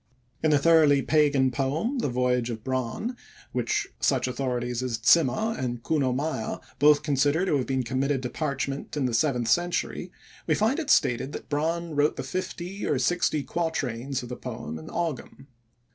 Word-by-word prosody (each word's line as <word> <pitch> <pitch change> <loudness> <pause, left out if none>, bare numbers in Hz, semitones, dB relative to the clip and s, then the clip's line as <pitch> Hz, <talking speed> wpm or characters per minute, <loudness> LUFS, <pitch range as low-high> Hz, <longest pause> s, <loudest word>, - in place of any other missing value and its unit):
In 160 - +2
the 150 - +5
thoroughly 150 -2 +5
pagan 145 -4 +3
poem, 150 - -1
The 235 - 0
Voyage 125 -1 +1
of 110 -2 -5
Bran, 130 - -2 0.4
which 420 -1 0
such 130 -2 +1
authorities 125 -2 -2
as 125 -3 -2
Zimmer 170 - +4
and 120 -2 -4
Kuno 140 -5 +1
Meyer 135 -3 -2 0.2
both 150 +1 +5
consider 145 +4 +2
to 185 - +1
have 130 - -2
been 130 -1 0
committed 130 +2 -1
to 125 - -2
parchment 140 -1 -3
in 140 - +1
the 125 - -1
seventh 120 -1 +1
century, 175 +7 0 0.4
we - - +3
find 225 +9 +1
it 305 -3 -4
stated 130 - +2
that - - -8
Bran 165 +3 -1
wrote 145 +1 +2
the - - -4
fifty 185 +1 -5
or 145 - +1
sixty 155 +2 +1
quatrains 135 -6 -2
of 120 - -8
the 125 - -4
poem 115 -11 -6
in 80 - -11
Ogam. 150 -4 -4
140 Hz, 175 wpm, -26 LUFS, 125-160 Hz, 0.4 s, the